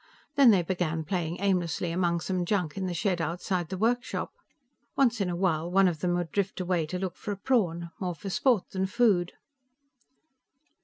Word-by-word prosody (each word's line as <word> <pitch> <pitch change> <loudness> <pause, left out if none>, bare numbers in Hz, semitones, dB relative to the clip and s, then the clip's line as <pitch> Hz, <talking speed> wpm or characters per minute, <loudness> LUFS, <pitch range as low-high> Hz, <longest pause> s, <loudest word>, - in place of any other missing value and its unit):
Then 280 -4 +7
they 195 -5 +5
began 165 -3 -1
playing 170 0 -2
aimlessly 180 -3 0
among 170 -1 0
some 185 +1 -1
junk 175 -4 -1
in 190 -1 -2
the 180 - -2
shed 180 0 0
outside 175 0 -2
the 190 - -4
workshop. 240 +5 -1 0.6
Once 240 -5 +2
in 190 - 0
a 175 - -2
while 170 -3 0
one 195 +1 +4
of 170 -4 -1
them 175 +2 0
would 175 -2 -2
drift 200 -2 -1
away 180 -3 0
to 180 - -3
look 185 -2 -3
for 210 - -5
a 200 - -3
prawn, 175 -8 0
more 180 -3 -2
for 195 +5 -6
sport 240 -1 +2
than 190 0 -1
food. 205 -5 +2
180 Hz, 190 wpm, -28 LUFS, 170-195 Hz, 0.6 s, Then